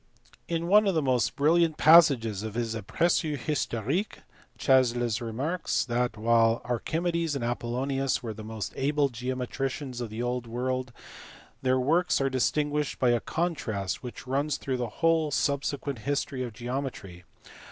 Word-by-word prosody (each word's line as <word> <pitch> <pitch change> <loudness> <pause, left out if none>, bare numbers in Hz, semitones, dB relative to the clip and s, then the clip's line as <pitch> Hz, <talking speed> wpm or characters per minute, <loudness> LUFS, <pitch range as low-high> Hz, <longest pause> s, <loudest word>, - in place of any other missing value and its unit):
In 170 0 -2
one 210 +3 +5
of 195 - +1
the 160 - +2
most 130 -3 +1
brilliant 160 +2 +3
passages 140 - +6
of 110 0 -6
his 115 -2 -1
Apergu 150 - 0
histo 120 -4 -2
rique 180 - -2 0.3
Chasles 120 -3 +2
remarks 135 +10 -1
that, 120 -2 -1
while 115 +1 +3
Archimedes 165 +6 -1
and 135 - -3
Apollonius 130 +3 -1
were 115 -2 -4
the 110 +1 -9
most 110 -2 -5
able 145 +1 +1
geometricians 130 +1 -4
of 120 - -4
the 110 +3 -4
old 125 -1 -2
world, 130 +2 -2 0.7
their 130 0 +2
works 165 +8 +2
are 135 -1 0
distinguished 145 +3 0
by 125 -2 +3
a 120 - +2
contrast 115 - -2
which 125 +1 -8
runs 140 +3 0
through 130 -2 -3
the 120 -2 -3 0.2
whole 165 -2 +3
subsequent 140 -1 -1
history 140 +1 -2
of 125 -2 -3
geometry. 120 -6 -5
130 Hz, 150 wpm, -28 LUFS, 120-150 Hz, 0.7 s, passages